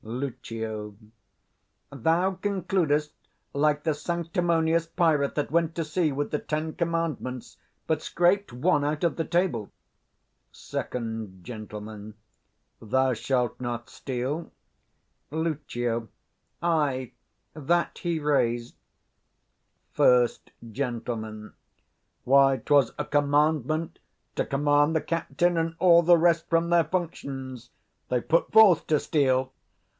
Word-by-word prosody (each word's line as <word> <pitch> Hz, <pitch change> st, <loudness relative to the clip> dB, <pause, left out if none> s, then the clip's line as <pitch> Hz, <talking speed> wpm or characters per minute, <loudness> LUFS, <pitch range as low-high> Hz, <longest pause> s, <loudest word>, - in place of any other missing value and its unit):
Lucio. 110 Hz, -3 st, -5 dB, 1.0 s
Thou 165 Hz, +8 st, +1 dB
concludest 175 Hz, -7 st, 0 dB, 0.4 s
like 150 Hz, +1 st, +1 dB
the 160 Hz, -, +1 dB
sanctimonious 170 Hz, 0 st, 0 dB
pirate, 160 Hz, -4 st, +1 dB
that 145 Hz, -2 st, -2 dB
went 165 Hz, 0 st, +1 dB
to 165 Hz, -, -2 dB
sea 155 Hz, 0 st, 0 dB
with 145 Hz, +1 st, -3 dB
the 150 Hz, -, 0 dB
Ten 155 Hz, +1 st, -3 dB
Commandments, 165 Hz, -7 st, -3 dB, 0.3 s
but 155 Hz, -1 st, 0 dB
scraped 180 Hz, +5 st, +1 dB
one 145 Hz, +5 st, +1 dB
out 150 Hz, +2 st, -2 dB
of 170 Hz, -, +1 dB
the 165 Hz, -, -1 dB
table. 165 Hz, -, 0 dB, 0.8 s
Sec. -, -, -6 dB, 0.5 s
Gent. 110 Hz, -2 st, -8 dB, 1.1 s
'Thou 130 Hz, +4 st, +1 dB
shalt 125 Hz, +1 st, -1 dB
not 120 Hz, -1 st, -4 dB
steal'? 135 Hz, +5 st, -4 dB, 0.8 s
10 155 Hz, -, -4 dB
Lucio. 120 Hz, -7 st, -2 dB, 0.6 s
Ay, 145 Hz, -7 st, 0 dB, 0.4 s
that 170 Hz, +3 st, 0 dB
he 170 Hz, -2 st, -1 dB
razed. 120 Hz, -5 st, 0 dB, 1.2 s
First 125 Hz, -1 st, +3 dB, 0.2 s
Gent. 120 Hz, -1 st, -3 dB, 1.2 s
Why, 135 Hz, +1 st, +5 dB
'twas 140 Hz, -3 st, +3 dB
a -, -, -2 dB
commandment 150 Hz, +2 st, +1 dB, 0.4 s
to -, -, 0 dB
command 145 Hz, +2 st, +2 dB
the 160 Hz, -, +2 dB
captain 170 Hz, +1 st, 0 dB
and 165 Hz, 0 st, -1 dB
all 170 Hz, -2 st, +6 dB
the 170 Hz, +1 st, +6 dB
rest 170 Hz, 0 st, +2 dB
from 165 Hz, 0 st, +2 dB
their 170 Hz, -2 st, +4 dB
functions: 140 Hz, -7 st, -5 dB, 0.4 s
they 125 Hz, -, +1 dB
put 165 Hz, +7 st, +1 dB
forth 210 Hz, -7 st, +6 dB
to 155 Hz, -2 st, +3 dB
steal. 130 Hz, -3 st, +1 dB
150 Hz, 110 wpm, -26 LUFS, 130-165 Hz, 1.2 s, all